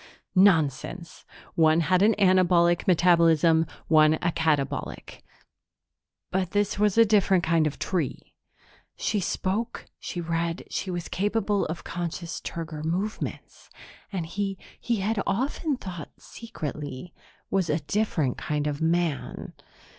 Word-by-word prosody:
Nonsense! 170 -2 +2 0.3
One 160 0 +4
had 180 +3 +2
an 215 +2 +5
anabolic 180 -3 +4
metabolism, 165 -2 +4 0.2
one 155 0 +5
a 170 +2 -1
catabolic. 150 -4 -2 1.1
But 185 -1 -1
this 205 -1 0
was 210 0 +2
a 230 - +8
different 195 -4 +3
kind 165 -1 +2
of 150 - -5
tree. 165 -9 -3 0.6
She 210 - -1
spoke, 200 +5 -2
she 175 - -5
read, 165 0 -2
she 190 - -3
was 175 -2 -4
capable 205 0 0
of 165 +2 -5
conscious 170 -1 -5
turgor 160 -2 -5
movements. 185 +7 -4 0.4
And 185 -5 -3
he, 195 +3 -3 0.2
he 235 - -1
had 210 +1 0
often 270 - -1
thought 175 - -7
secretly, 155 - -7 0.4
was 190 -4 +1
a 155 +1 0
different 155 - -1
kind 150 -1 -2
of 145 0 -2
man. 165 -2 -1
175 Hz, 125 wpm, -26 LUFS, 160-195 Hz, 1.1 s, a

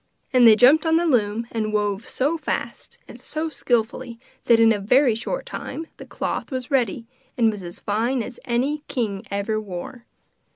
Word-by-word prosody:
And 250 -2 +7
they 220 - +9
jumped 265 +8 +6
on 320 - +3
the 340 +1 +2
loom, 230 -6 +1
and 215 -2 -2
wove 205 0 -1
so 285 +5 0
fast 325 - -5
and - - -12
so 315 +1 -3
skilfully 240 -3 -2 0.3
that 230 -1 +5
in 225 0 +6
a 205 - -2
very 250 +5 +4
short - - -4
time 330 -8 -6
the - - -11
cloth - - -4
was 255 -1 -5
ready 240 -4 0 0.3
and 225 -2 +4
was 205 -2 -7
as 175 -1 -9
fine 230 +4 0
as 245 - -9
any 265 +5 0
king 210 -6 -2
ever 200 +2 -2
wore. 215 +6 -8
235 Hz, 180 wpm, -23 LUFS, 215-265 Hz, 0.3 s, they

